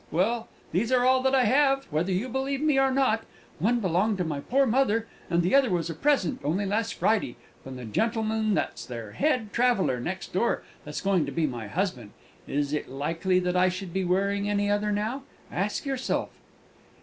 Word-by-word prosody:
Well, 225 +8 0 0.2
these 215 +9 0
are 250 -1 +4
all 260 0 +4
that 265 +1 +2
I 260 - +4
have, 275 +1 +3
whether 160 +5 0
you 190 +7 0
believe 265 +2 -2
me 300 -2 +3
or 270 0 +4
not; 260 -4 +2 0.4
one 235 +8 +2
belonged 195 +2 +1
to 180 - 0
my 155 -4 -3
poor 270 - +2
mother, 230 -2 +2 0.2
and 170 0 +2
the 180 - 0
other 275 -3 +5
was 170 -2 -1
a - - -4
present, 260 - +1
only 175 +8 0
last 220 +3 -1
Friday, 215 - +1 0.3
from 130 -1 -8
the 125 -1 -7
gentleman 220 - 0
that's - - -2
their 115 -4 -7
head 250 - 0
traveller, 235 - +2
next 185 +9 -5
door, 210 +6 +1 0.2
and 150 - -7
is - - -2
going 190 -6 +1
to - - -4
be 160 +3 0
my 120 -6 -4
husband. 125 - -3 0.3
Is 145 0 -1
it 150 - -2
likely 165 +7 0
that 180 0 -1
I 185 +1 +4
should 185 -1 -6
be 190 0 0
wearing 200 +3 0
any 205 0 +1
other 210 +1 +1
now? 215 +6 -1 0.3
ask 200 +8 -2
yourself!" 270 -2 -1
205 Hz, 200 wpm, -27 LUFS, 170-245 Hz, 0.4 s, other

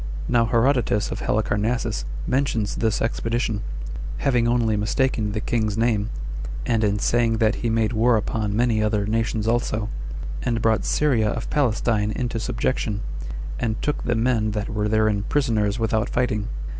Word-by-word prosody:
Now 120 -1 +3
Herodotus 120 -3 +2
of - - -4
Halicarnassus 105 - 0 0.2
mentions 125 -6 0
this 110 -2 +1
expedition, 115 -1 -1 0.6
having 120 -4 +2
only 120 -2 +2
mistaken 105 0 0
the 110 - -1
king's 110 -2 -1
name; 110 -2 +1 0.6
and 115 -1 +1
[in 105 -1 +2
saying 115 +1 +2
that] 110 0 +3
he 120 - 0
made 115 0 +1
war 115 +1 +4
upon 105 -1 -1
many 115 -1 +2
other 105 -1 +1
nations 110 0 0
also, 115 -2 0 0.5
and 115 -2 0
brought 110 0 +2
Syria 125 -8 +2
of 115 - -4
Palestine 115 -5 +1
into 120 0 -2
subjection, 115 -3 -1 0.6
and 110 -3 -1
took 150 - -1
the 120 - 0
men 115 -2 +2
that 105 -1 -2
were 105 -2 -1
therein 110 -1 +2
prisoners 110 -7 +1
without 110 0 0
fighting. 105 -4 0
110 Hz, 150 wpm, -23 LUFS, 105-120 Hz, 0.6 s, war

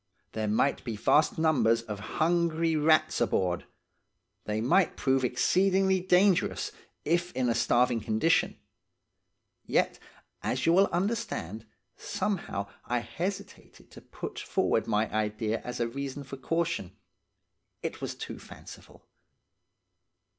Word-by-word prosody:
There 110 -1 -2
might 110 +6 +1
be 115 -3 -4
vast 150 +8 +3
numbers 120 -8 +3
of 105 -3 -6 0.2
hungry 165 0 +2
rats 155 0 +3
aboard. 90 -2 0 0.8
They 105 0 -1
might 160 - +2
prove 135 -1 +1
exceedingly 190 +9 +2
dangerous, 185 +1 +2 0.3
if 175 +2 +1
in 130 -1 0
a 120 - +2
starving 120 +1 +2
condition; 110 +10 +1 1.1
yet, - - 0 0.4
as - - -1
you 165 - +4
will 195 +3 +5
understand, 175 - -3 0.3
somehow 195 - -3 0.2
I 120 - 0
hesitated 175 - -6
to - - -12
put - - -7
forward - - 0
my 110 0 +1
idea 110 +1 -1
as 125 - -5
a 120 - +1
reason 140 +3 -5
for 135 0 -8
caution, 165 - -2 0.9
it - - -4
was - - -4
too - - -7
fanciful. - - -13
140 Hz, 120 wpm, -29 LUFS, 115-175 Hz, 1.1 s, will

